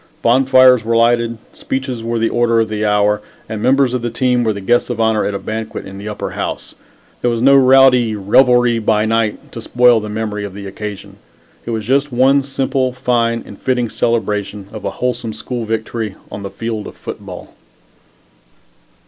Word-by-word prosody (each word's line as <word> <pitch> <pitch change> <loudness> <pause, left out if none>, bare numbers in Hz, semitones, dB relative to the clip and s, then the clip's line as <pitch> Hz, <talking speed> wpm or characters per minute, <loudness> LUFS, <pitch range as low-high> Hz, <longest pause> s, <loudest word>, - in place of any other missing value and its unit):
Bonfires 130 0 +5
were 115 +1 0
lighted, 115 0 +2 0.2
speeches 130 -3 -4
were 115 0 -2
the 115 0 0
order 120 -1 +2
of 110 -1 0
the 105 0 -3
hour, 105 0 +2 0.3
and 110 -1 -5
members 135 0 +2
of 125 - -1
the 120 - -2
team 125 +1 +1
were 110 - +1
the 100 - -5
guests 120 +6 +1
of 120 -2 -4
honor 110 -1 +1
at 100 - -2
a - - 0
banquet 110 +1 -5
in 95 0 -9
the 105 +2 -6
Upper 105 - -5
House. - - -5 0.5
There 120 - +1
was 115 -1 -1
no 135 +3 +5
rowdy 130 -4 +5
"revelry 120 +3 +3
by 110 -1 +1
night" 115 -1 -1
to 115 - -7
spoil 120 0 +4
the 105 0 -6
memory 105 -1 -3
of 100 -2 -7
the 100 -1 -8
occasion. 100 0 -8 0.5
It - - -3
was 110 -2 -3
just 140 +4 +1
one 135 +3 +3
simple, 135 -1 -1
fine 120 -2 0
and 100 - -12
fitting 125 -3 -1
celebration 105 -4 -2
of 110 - -8
a - - 0 0.2
wholesome 120 -3 -2
school 120 +2 -5
victory 110 -1 -3 0.2
on 100 - -6
the 100 - -5
field 110 +1 -5
of - - -11
football. - - -9
115 Hz, 190 wpm, -17 LUFS, 105-125 Hz, 0.5 s, Bonfires